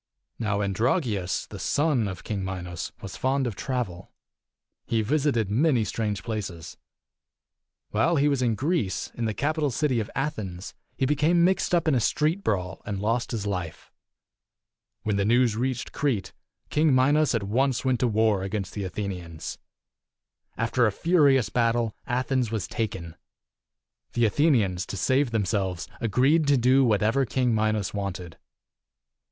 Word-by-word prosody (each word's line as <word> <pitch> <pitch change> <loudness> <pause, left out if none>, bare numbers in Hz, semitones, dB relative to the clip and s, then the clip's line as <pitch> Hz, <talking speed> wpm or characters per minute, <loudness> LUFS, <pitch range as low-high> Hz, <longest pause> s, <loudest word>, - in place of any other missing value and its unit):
ii. 115 - -3
Now 105 -1 0
Androgeus, 105 - 0
the - - -9
son 145 -7 +1
of 95 -1 -6
King 100 -3 -3
Minos, 90 -3 -5
was 95 - -6
fond 135 +1 0
of 115 -5 -3
travel. 110 -9 -4 0.8
He 115 -1 +1
visited 130 -5 +1
many 130 0 +3
strange 105 -3 -2
places. 100 -8 -5 1.2
While 140 +11 +2
he 145 -1 +3
was 140 -3 +1
in 120 -3 +2
Greece, 140 - -1
in 120 - -3
the 110 -2 -2
capital 150 +1 0
city 130 -2 0
of 105 - -3
Athens, 105 -10 -4 0.2
he 135 - +1
became 150 +5 +3
mixed 185 0 +2
up 170 -2 +1
in 155 - +4
a 130 - +3
street 155 - +1
brawl 90 -3 -2
and 100 -2 -4
lost 115 +4 0
his 110 -4 -3
life. 90 -5 -4 1.1
When 105 -2 0
the 100 - +2
news 120 +1 +3
reached 125 +1 -2
Crete, 130 -9 -1 0.4
King 150 -2 +3
Minos 145 +2 +3
at 110 - -1
once 130 +6 0
went 130 -2 +2
to 125 - +2
war 110 -3 +2
against 95 0 -3
the 100 - -4
Athenians. 90 -5 -5 1.0
After 120 +1 +2
a - - +1
furious 140 - +3
battle, 115 -2 +1
Athens 130 -1 0
was 110 -2 -3
taken. 95 -7 -4 1.0
The 120 - +1
Athe 145 +9 +3
nians, 95 - +1
to 100 - -5
save 130 +9 +2
themselves, 100 -5 -1
agreed 135 +8 +2
to 145 -1 +4
do 130 +3 +4
what 105 -5 +2
ever 120 +6 +2
King 125 -1 0
Minos 110 -2 0
wanted. 95 -4 -5
115 Hz, 155 wpm, -26 LUFS, 100-135 Hz, 1.2 s, in